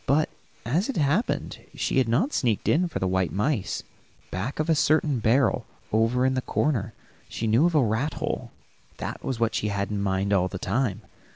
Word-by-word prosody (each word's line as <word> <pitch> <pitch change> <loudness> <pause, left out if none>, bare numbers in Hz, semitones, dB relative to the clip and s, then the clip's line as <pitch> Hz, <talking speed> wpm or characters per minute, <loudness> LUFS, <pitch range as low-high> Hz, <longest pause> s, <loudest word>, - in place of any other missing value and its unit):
But, 150 +3 +3 0.4
as 165 - 0
it 275 - -2
happened, 155 - 0 0.2
she - - +1
had 125 -3 +1
not 180 - +1
sneaked 115 -6 0
in 175 +3 +3
for 160 - -2
white 95 -3 +1
mice; 105 - -1 0.5
back 105 +12 -3
of 155 - 0
a 165 - +4
certain 150 -3 +2
barrel, 120 +1 +2 0.3
over 115 +3 +3
in 130 - +2
the 130 - 0
corner, 115 -7 -1 0.3
she 115 - -3
knew 115 +9 +4
of 175 - -1
a 145 - +5
rat 115 +7 0
hole. - - -3 0.5
That - - -5
was 130 -3 -3
what 115 -1 +1
she 105 - 0
had 100 -1 -2
in 105 -1 -1
mind 100 0 0
all 95 -2 +3
the 95 - -5
time. 105 +2 -1
120 Hz, 195 wpm, -26 LUFS, 105-150 Hz, 0.5 s, a